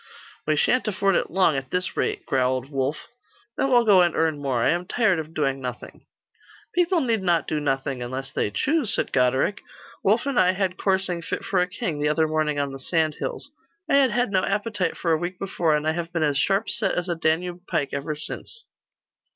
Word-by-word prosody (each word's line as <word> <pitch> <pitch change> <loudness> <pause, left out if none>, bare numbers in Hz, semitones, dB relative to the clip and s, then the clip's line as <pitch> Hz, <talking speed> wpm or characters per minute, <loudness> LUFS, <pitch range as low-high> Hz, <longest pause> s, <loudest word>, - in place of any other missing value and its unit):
'We 155 - +3
shan't 250 +11 +2
afford 195 -2 +1
it - - 0
long, 180 -4 +3
at 135 -1 -4
this 180 +4 -1
rate,' - - -1
growled 130 +1 0
Wulf. 135 +2 -2 0.5
'Then 270 - 0
we'll 240 -2 +4
go 200 -4 +6
and 175 -2 +2
earn 160 -3 0
more. 130 -4 0
I - - +3
am 175 +2 0
tired 210 -7 +2
of 160 +1 -7
doing 135 -3 0
nothing.' 125 -1 -8 0.7
'People 355 -2 +2
need 230 -6 0
not 175 -3 +1
do 155 - -1
nothing, 135 -2 -2
unless 130 +2 -5
they 105 - -1
choose,' 275 - 0
said - - -1
Goderic. 130 +10 +2 0.4
'Wulf 215 +6 +2
and 280 -3 +1
I 185 0 +4
had 185 -1 -1
coursing 190 -3 0
fit - - -4
for 190 -2 +1
a 180 - +1
king, 180 -5 -4
the 150 0 +1
other 160 +1 +2
morning 155 -1 0
on 140 -1 -1
the 135 - -8
sand 155 +2 0
hills. - - -5 0.4
I - - 0
had 275 -2 +5
had 240 -1 0
no 185 -1 +2
appetite 205 -1 -1
for 170 - -1
a 160 - +4
week 175 +2 -4
before, 175 -5 0
and 150 +1 -1
I - - +3
have 170 +1 -4
been 165 -2 0
as 145 -2 +1
sharp 195 +3 +1
set - - +1
as 180 0 -2
a 175 - 0
Danube 175 +2 -1
pike 140 -2 -1
ever 145 +2 -3
since. 460 - -7
170 Hz, 215 wpm, -24 LUFS, 145-195 Hz, 0.7 s, go